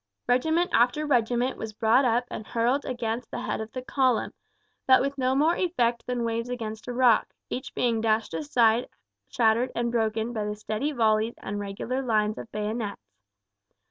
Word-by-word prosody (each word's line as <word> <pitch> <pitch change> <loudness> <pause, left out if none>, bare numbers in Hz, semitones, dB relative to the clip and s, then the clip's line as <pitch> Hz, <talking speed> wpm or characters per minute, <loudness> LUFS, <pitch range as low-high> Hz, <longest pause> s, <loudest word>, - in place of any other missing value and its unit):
Regiment 320 +8 +2
after 250 +6 +3
regiment 245 -1 +1
was 220 -1 -5
brought 225 +5 +3
up 240 +1 +2
and 215 - -6
hurled 240 +5 0
against 240 -2 -3
the 245 - -5
head - - -2
of 220 0 -7
the 255 +1 -6
column, 255 -3 +1 0.5
but 260 0 +7
with 275 +1 -1
no 260 -1 +1
more 310 +5 +3
effect 240 -10 0
than 250 -1 -1
waves 230 +1 -2
against 220 -3 -5
a - - -3
rock, 245 -2 +3 0.2
each 255 - -5
being 230 -3 +1
dashed 220 -4 +1
aside 220 - +2 0.4
shattered 235 +2 +2
and 235 0 0
broken 225 0 0
by 215 -2 -2
the 210 0 -3
steady 215 +7 -3
volleys 220 -3 +1
and 205 +1 -5
regular 205 +6 -3
lines 215 -4 0
of 225 - -9
bayonets. 210 - -4
235 Hz, 175 wpm, -26 LUFS, 220-255 Hz, 0.5 s, but